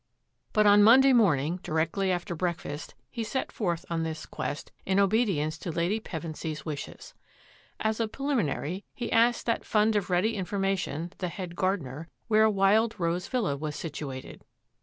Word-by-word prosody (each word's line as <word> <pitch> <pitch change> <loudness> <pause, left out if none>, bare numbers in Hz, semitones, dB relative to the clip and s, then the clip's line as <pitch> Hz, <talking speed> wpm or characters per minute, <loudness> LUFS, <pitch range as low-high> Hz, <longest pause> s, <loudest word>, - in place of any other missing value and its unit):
But 215 -1 +3
on 205 0 +7
Mon 230 +5 +8
day 270 0 +5
morning, 170 - +3
directly 165 +5 0
after 175 +1 -2
breakfast, 165 -3 -4 0.2
he 230 - -3
set 260 +4 -3
forth 175 -7 -2
on 165 -1 -1
this 160 -1 -4
quest 145 - -5
in 190 +1 +1
obedience 195 -7 +1
to 175 - -4
Lady 170 +6 0
Pevensy's 160 -4 -6
wishes. 150 -3 -7 0.7
As 220 0 0
a 225 - +1
preliminary, 205 - -2
he 240 - -4
asked 235 +1 +3
that 230 - 0
fund 215 0 +2
of 205 -2 0
ready 185 +6 +2
information, 190 -4 -2
the 185 - -1
head 175 -1 -6
gardener, 165 -6 -2 0.2
where 220 -1 +5
Wild 210 +2 +3
Rose 170 +2 -1
Villa 225 - 0
was 150 +1 -4
situated. 145 -4 -6
185 Hz, 160 wpm, -28 LUFS, 160-215 Hz, 0.7 s, Mon